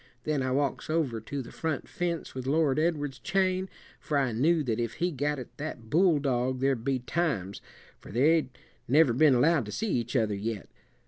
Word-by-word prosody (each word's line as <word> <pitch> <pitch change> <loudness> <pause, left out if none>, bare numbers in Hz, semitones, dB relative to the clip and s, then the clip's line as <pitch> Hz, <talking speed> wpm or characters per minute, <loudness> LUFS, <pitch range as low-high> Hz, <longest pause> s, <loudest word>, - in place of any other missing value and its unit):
Then 150 -3 0
I 130 - -1
walks 140 +2 -1
over 145 -9 0
to 135 +5 -5
the - - -11
front 160 -4 -3
fence 175 -3 -3
with 130 0 -5
Lord 150 -1 +2
Edward's 145 -4 -1
chain, 190 +3 0 0.3
for 150 - -1
I 135 -3 +1
knew 155 +8 +2
that 115 -4 -1
if 115 -1 -2
he 175 +2 -1
got 145 0 -1
at 130 - -9
that 125 -7 -7
bulldog 140 -7 +2
there'd 135 -3 +1
be 135 +1 +1
times, 125 - -2 0.4
for - - -12
they'd 145 +5 +3 0.4
never 140 -1 +5
been 140 +2 +5
allowed 145 -1 +3
to - - -6
see 220 - -2
each 120 +1 -2
other 110 -4 +2
yet. 105 0 -4
140 Hz, 190 wpm, -28 LUFS, 120-160 Hz, 0.4 s, never